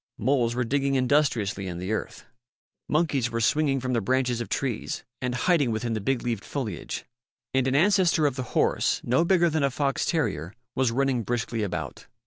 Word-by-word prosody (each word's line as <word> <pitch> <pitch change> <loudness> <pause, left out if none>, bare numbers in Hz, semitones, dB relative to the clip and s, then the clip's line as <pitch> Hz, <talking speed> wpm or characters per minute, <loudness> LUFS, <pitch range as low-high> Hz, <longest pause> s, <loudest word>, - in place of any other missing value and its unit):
Moles 120 -1 +1
were 125 - +1
digging 140 +3 0
industriously 125 -8 +1
in 90 -2 -5
the 90 +4 -4
earth. 110 - -4 0.6
Monkeys 150 -6 +1
were 115 0 -2
swinging 135 +4 +2
from 130 0 -2
the 115 - +1
branches 125 +1 0
of 120 - -5
trees 125 -5 -2 0.2
and 125 -1 -1
hiding 145 0 +2
within 115 +1 -2
the 110 - -2
big 130 +4 0
leaved 115 -4 -2
foliage. 110 - -4 0.5
And 130 -1 +2
an 130 - +1
ancestor 180 -2 +4
of 140 - +1
the 130 - -3 0.2
horse, - - +2
no 130 +7 +2
bigger 175 -1 +4
than 160 -2 0
a 140 - +3
fox 140 +1 -1
terrier, 100 - -1 0.2
was 130 -2 +2
running 130 0 +1
briskly 115 +1 -2
about. 90 -9 -4
125 Hz, 185 wpm, -26 LUFS, 115-140 Hz, 0.6 s, ancestor